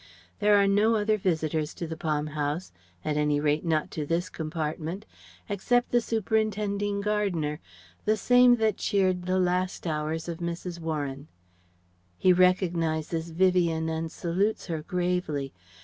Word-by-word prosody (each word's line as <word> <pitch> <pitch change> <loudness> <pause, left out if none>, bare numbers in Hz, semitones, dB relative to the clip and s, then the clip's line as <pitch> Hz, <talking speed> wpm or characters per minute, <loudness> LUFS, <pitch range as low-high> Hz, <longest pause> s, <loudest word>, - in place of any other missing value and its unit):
There 205 0 +5
are 200 - +4
no 205 +3 +3
other 215 0 +2
visitors 160 -5 -1
to 175 - -4
the 160 0 -5
Palm 155 -2 -1
House, 150 +4 -2 0.3
at 150 -1 0
any 150 -1 +2
rate 150 +1 +1
not 160 -3 0
to 155 - -3
this 165 +4 -1
compartment, 160 +4 -4 0.4
except 245 +5 +1
the 240 - +4
superintending 210 -2 -1
gardener 195 -8 -1 0.5
the 215 +1 +2
same 245 +2 +6
that 220 -3 +1
cheered 185 -3 +1
the 185 0 +2
last 180 0 0
hours 155 0 -2
of 170 -1 -5
Mrs. 170 0 -4
Warren. 145 -3 -4 0.9
He 185 - +5
recognizes 170 -3 +1
Vivien 170 -2 +2
and 160 0 -3
salutes 190 +6 -1
her 165 -4 -3
gravely. 175 -5 -2
175 Hz, 140 wpm, -27 LUFS, 160-200 Hz, 0.9 s, same